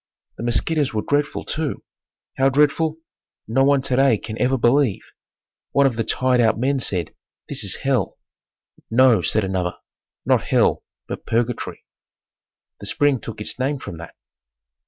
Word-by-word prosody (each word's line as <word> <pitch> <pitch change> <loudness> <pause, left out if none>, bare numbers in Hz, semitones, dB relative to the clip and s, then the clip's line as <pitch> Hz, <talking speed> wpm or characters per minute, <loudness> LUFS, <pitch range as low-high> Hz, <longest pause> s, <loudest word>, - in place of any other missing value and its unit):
The - - -6
mosquitoes 130 +3 0
were 105 - 0
dreadful, 145 0 0
too. 155 -2 -3 0.5
How 135 +1 +3
dreadful, 150 +3 +2 0.5
no 125 +5 +2
one 140 -1 +3
today 135 -3 +3
can 110 - -7
ever 130 +1 +2
believe. 120 -2 +2 0.7
One 140 - +4
of 130 -4 +2
the 115 - -1
tiredout 125 -2 +2
men 135 +4 +1
said, 90 -9 -1 0.3
"This - - -1
is - - 0
Hell!" 130 -8 0 0.7
"No," 120 -3 +5
said 105 +6 +1
another, 95 -2 -2 0.5
"Not - - +2
Hell, - - +2 0.2
but - - -7
Purgatory." 115 +1 -2 0.9
The - - -7
spring 145 -3 +2
took 110 -1 -8
its 105 - -5
name 140 +3 0
from 85 -10 -8
that. 85 - -10
125 Hz, 145 wpm, -21 LUFS, 110-140 Hz, 0.9 s, No